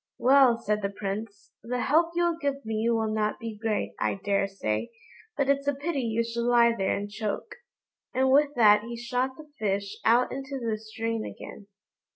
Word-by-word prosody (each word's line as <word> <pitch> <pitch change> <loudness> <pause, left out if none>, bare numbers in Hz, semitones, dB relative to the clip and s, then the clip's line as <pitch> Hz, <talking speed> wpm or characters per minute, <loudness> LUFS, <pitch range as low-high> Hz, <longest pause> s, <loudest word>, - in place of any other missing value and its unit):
"Well!" 260 -2 +5
said 210 -1 -1
the 200 - -1
Prince, 200 +1 -6
"the 245 +2 -3
help 330 +5 +2
you'll 345 -1 +1
give 280 -4 -2
me 220 +1 0
will 220 -2 +1
not 215 0 -1
be 230 -2 -6
great, 215 0 -2
I - - 0
daresay, 195 - -1 0.5
but 280 - +1
it's 280 0 +1
a 285 - +2
pity 290 +1 -2
you 230 -1 0
should 235 0 -3
lie 235 -1 +4
there 195 -3 0
and 205 - -4
choke;" 210 0 -4 0.6
and 260 +1 +2
with 290 +1 +4
that 210 -3 +6
he 235 +1 -6
shot 250 +2 -2
the 305 -1 -13
fish 200 -1 -1
out 235 +3 +4
into 270 +1 -5
the 225 -3 -2
stream 225 0 -3
again. 200 - -9
230 Hz, 185 wpm, -27 LUFS, 210-265 Hz, 0.6 s, that